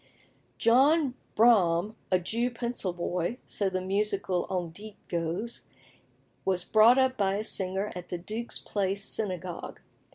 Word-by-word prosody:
John 270 +4 +4 0.2
Braham, 210 -4 +4
a 185 - +4
Jew 230 +7 -1
pencil 235 -5 -3
boy 175 +4 -2
so 200 -2 -1
the 185 0 -2
musical 195 -2 0
on 180 -3 -2
dit 205 +4 -11
goes 170 +7 -3 0.8
was 185 -2 0
brought 220 +6 +6
up 260 -1 +2
by 195 -1 +1
a 210 - -2
singer 190 0 0
at 180 -1 -8
the 175 - -3
Duke's 215 +7 -4
Place 200 0 -2
Synagogue. 185 -4 -4
200 Hz, 135 wpm, -28 LUFS, 180-230 Hz, 0.8 s, brought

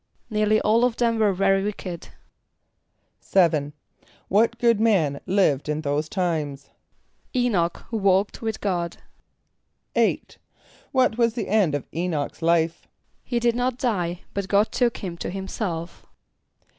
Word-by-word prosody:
=Nearly 215 0 +3
all 225 +3 +3
of 245 -2 +1
them 230 -2 +1
were 210 -2 +4
very 195 +1 +2
wicked.= 190 -4 -5 1.1
=7.= 155 -6 +2 0.6
What 225 +4 +3
good 235 -3 +3
man 185 -11 +2
lived 180 -7 +2
in 150 +1 -1
those 150 +1 -1
times? 155 -7 -2 0.6
=[=E]´n[)o]ch, 205 -9 +1
who 225 - -1
walked 195 0 +2
with 225 -1 -3
God.= 175 -4 -2 1.0
=8.= - - 0 0.5
What 255 -3 +2
was 230 -1 +2
the 225 -5 -3
end 195 -8 +3
of 145 - -4
[=E]´n[)o]ch's 165 -4 -3
life? 165 0 +1 0.4
=He 240 - -1
did 235 0 +2
not 250 0 0
die, 180 -9 -1
but 200 -1 -3
God 205 +2 +2
took 240 -2 +1
him 175 -3 -6
to - - -4
himself. 185 -3 -5
195 Hz, 135 wpm, -24 LUFS, 170-225 Hz, 1.1 s, were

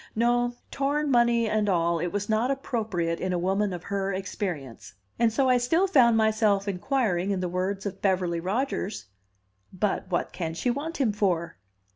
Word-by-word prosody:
No, 240 +1 +2 0.2
torn 285 +1 0
money 235 -2 +3
and 215 -1 +1
all, 170 -2 +1
it 175 - -1
was 205 +3 -3
not 220 +3 +1
appropriate 215 -11 -2
in 185 0 -2
a - - +1
woman 195 +3 0
of 175 -1 -6
her 195 -1 -2
experience; 180 - -5 0.2
and 235 -1 +4
so 260 +4 +2
I 250 -1 +4
still 325 +10 +2
found 245 -11 +5
myself 215 -2 +2
inquiring 200 -2 0
in 195 -2 0
the 180 - -1
words 185 +3 -2
of 195 -1 -5
Beverly 180 -3 +1
Rodgers, 200 - -2 0.7
"But 190 0 -2
what 175 - -1
can 165 -3 -4
she 245 +8 0
want 300 +6 -4
him 245 -7 +1
for?" 180 - -1
205 Hz, 175 wpm, -26 LUFS, 180-240 Hz, 0.7 s, found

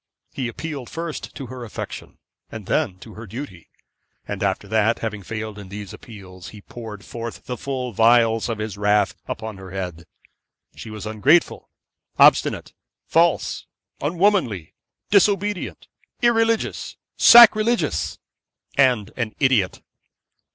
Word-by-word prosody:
He 130 -3 -3
appealed 140 +1 -6
first 165 -1 -6
to 140 - -6
her 125 0 -8
affection, 115 - -8 0.3
and 110 -3 -8
then 95 -1 0
to 110 - -11
her 110 +1 -10
duty; 100 - -8 0.6
and 100 -1 -5
after 100 +1 -1
that, 110 +2 +2
having 110 -2 -4
failed 110 +1 -6
in 100 -2 -10
these 100 0 -8
appeals, 95 -5 -12
he 105 - -12
poured 110 -3 -10
forth 115 -5 -7
the 125 - -4
full 125 -1 -4
vials 115 +1 +4
of 115 - -2
his 105 -2 -5
wrath 105 -2 +2
upon 110 -2 -5
her 95 -1 -10
head. 90 -3 -6 0.7
She - - -9
was 110 -1 -7
ungrateful, 130 +11 +2 0.5
obstinate, - - +4 0.3
false, 170 0 +1 0.3
unwomanly, 165 - +1 0.4
disobedient, 205 0 +1 0.4
irreligious, 225 -1 +1 0.2
sacrilegious, 235 0 +6 0.6
and 125 -7 +3
an 115 -4 -3
idiot. 125 -9 +2
115 Hz, 125 wpm, -22 LUFS, 105-140 Hz, 0.7 s, sacrilegious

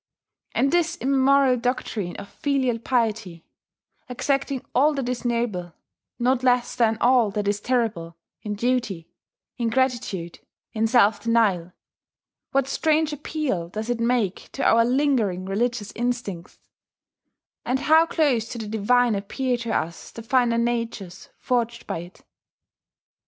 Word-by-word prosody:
And 275 - +2
this 340 -1 +1
immemorial 270 -2 +3
doctrine 230 -6 -2
of 200 - -8
filial 260 -4 -1
piety, 220 -8 -1 0.6
exacting 275 +1 -1
all 290 +4 +3
that 270 -3 -2
is 250 0 -3
noble, 230 -8 -2 0.4
not 250 +1 +1
less 250 -1 +2
than 225 -2 +2
all 245 -3 +4
that 205 0 -3
is 205 0 0
terrible, 220 -10 -1 0.2
in 210 -1 -4
duty, 230 -7 -1 0.5
in 235 -1 +1
gratitude, 235 -9 -1 0.3
in 225 0 +1
self 220 -3 +4
denial, 205 -7 +1 0.8
what 270 -1 +1
strange 310 +1 +1
appeal 290 - -3
does 215 +5 -4
it 240 - -2
make 230 -5 0
to - - -3
our 230 0 +5
lingering 240 -8 +1
religious 215 +2 -1
instincts; 235 -8 -3 1.1
and 260 +2 -1
how 320 +3 +5
close 255 -10 +1
to - - -6
the 220 -2 -5
divine 230 +3 +2
appear 245 +6 -1
to 235 -1 -4
us 170 -4 -3
the 230 - -10
finer 240 -1 +2
natures 230 -6 -3
forged 235 -2 -1
by - - -3
it! 175 +2 -12
235 Hz, 135 wpm, -24 LUFS, 210-255 Hz, 1.1 s, our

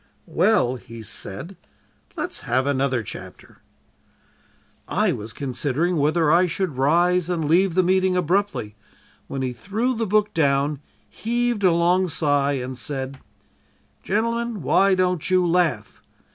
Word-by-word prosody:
"'Well,' 170 - +2
he 115 -1 -11
said, 110 - -5 0.6
'let's - - -3
have 130 +2 0
another 135 -3 0
chapter.' - - -11 1.3
"I - - +1
was 105 +1 -5
considering 145 +6 -1
whether 155 +2 +2
I 180 +2 +4
should 175 -3 -2
rise 175 +5 +2
and 170 -3 -1
leave 175 +2 +3
the 185 - +4
meeting 185 0 +2
abruptly, 180 - -1 0.5
when 135 -1 -4
he 125 -1 -2
threw 215 - -2
the 225 -2 -2
book 210 +1 +1
down, 140 -1 +1 0.3
heaved 240 -1 -1
a 185 - +5
long 175 +2 +2
sigh, 145 -3 +1
and 130 -1 -4
said: 135 +2 -4 0.8
"'Gentlemen, 230 -1 -1
why 190 +7 +4
don't 180 -3 0
you 185 -1 +3
laugh? 165 -10 0
170 Hz, 130 wpm, -23 LUFS, 140-185 Hz, 1.3 s, a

